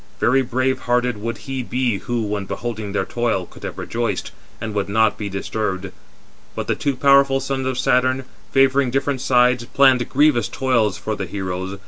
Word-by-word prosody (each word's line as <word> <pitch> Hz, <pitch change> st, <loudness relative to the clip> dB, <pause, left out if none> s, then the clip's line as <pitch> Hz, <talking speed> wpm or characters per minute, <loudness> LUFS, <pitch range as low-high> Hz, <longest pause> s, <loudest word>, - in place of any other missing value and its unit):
Very 130 Hz, +2 st, +3 dB
brave 130 Hz, +1 st, 0 dB
hearted 125 Hz, -2 st, +2 dB
would 115 Hz, +2 st, -3 dB
he 135 Hz, -1 st, -3 dB
be 125 Hz, -4 st, -1 dB
who, 120 Hz, -1 st, -2 dB
when 105 Hz, -1 st, -3 dB
beholding 110 Hz, -1 st, -4 dB
their 105 Hz, -, -1 dB
toil, 115 Hz, -6 st, -1 dB
could -, -, -16 dB
have -, -, -6 dB
rejoiced, 115 Hz, -5 st, -3 dB, 0.3 s
and 110 Hz, -1 st, -5 dB
would 100 Hz, -1 st, -1 dB
not 110 Hz, 0 st, +3 dB
be 105 Hz, -2 st, -5 dB
disturbed. 100 Hz, -1 st, -3 dB, 0.6 s
But -, -, -3 dB
the -, -, +1 dB
two 140 Hz, -2 st, -1 dB
powerful 140 Hz, 0 st, +4 dB
sons 135 Hz, -1 st, -2 dB
of 130 Hz, -1 st, -2 dB
Saturn, 130 Hz, 0 st, +2 dB, 0.3 s
favouring 135 Hz, -1 st, +3 dB
different 135 Hz, +1 st, -1 dB
sides, 125 Hz, -2 st, +3 dB
planned 130 Hz, -1 st, +3 dB
grievous 135 Hz, -6 st, +3 dB
toils 115 Hz, -7 st, +1 dB
for 105 Hz, +2 st, -3 dB
the 95 Hz, -2 st, -4 dB
heroes. 95 Hz, 0 st, -4 dB
120 Hz, 175 wpm, -21 LUFS, 105-130 Hz, 0.6 s, powerful